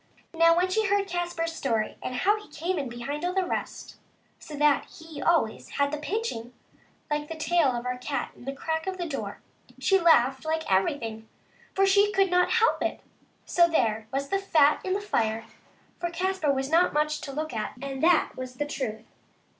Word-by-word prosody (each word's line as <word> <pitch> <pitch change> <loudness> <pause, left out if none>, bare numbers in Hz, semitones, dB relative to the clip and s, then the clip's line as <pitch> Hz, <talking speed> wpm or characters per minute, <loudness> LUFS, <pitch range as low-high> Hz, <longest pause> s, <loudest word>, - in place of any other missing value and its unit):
Now, 335 0 +5
when 360 +1 +3
she 430 +3 +1
heard 400 0 +2
Caspar's 345 -2 -2
story, 230 -8 -1
and 255 - -4
how 415 +11 +2
he 420 - -16
came 340 +4 -2
in 275 -3 -3
behind 275 +6 -5
all 360 +1 -1
the 380 -1 +2
rest, - - -5 0.4
so 305 - -9
that 295 -1 +3
he 320 -3 -11
always 320 -8 +1
had 280 0 +2
the 300 - -3
pinching, 300 - -4 0.6
like 295 0 -1
the 325 - -6
tail 335 -1 +2
of 240 +1 -4
our 250 0 -3
cat 275 +3 -3
in - - -14
the 270 - -2
crack 320 +4 -3
of 380 -1 -2
the 350 - -3
door, 295 -4 -5 0.4
she 385 -1 +3
laughed 270 -6 +4
like 320 0 -1
everything, 220 +3 -1 0.5
for 390 - +4
she 405 +1 +4
could 390 -1 +3
not 360 0 +3
help 460 0 +3
it. - - -2 0.4
So 345 -1 +4
there 225 -8 +1
was 275 +1 -2
the 390 - +1
fat 310 -7 +3
in 370 - -1
the 400 - -1
fire, 225 - -1 0.5
for 345 0 -2
Caspar 365 -2 0
was 270 +1 -2
not 345 +2 +4
much 300 +1 0
to 275 - -6
look 310 +1 -4
at, 215 -2 -3
and 270 0 -5
that 340 0 +4
was 255 -1 -7
the 290 - -2
truth. 225 -6 -4
310 Hz, 200 wpm, -27 LUFS, 265-360 Hz, 0.6 s, Now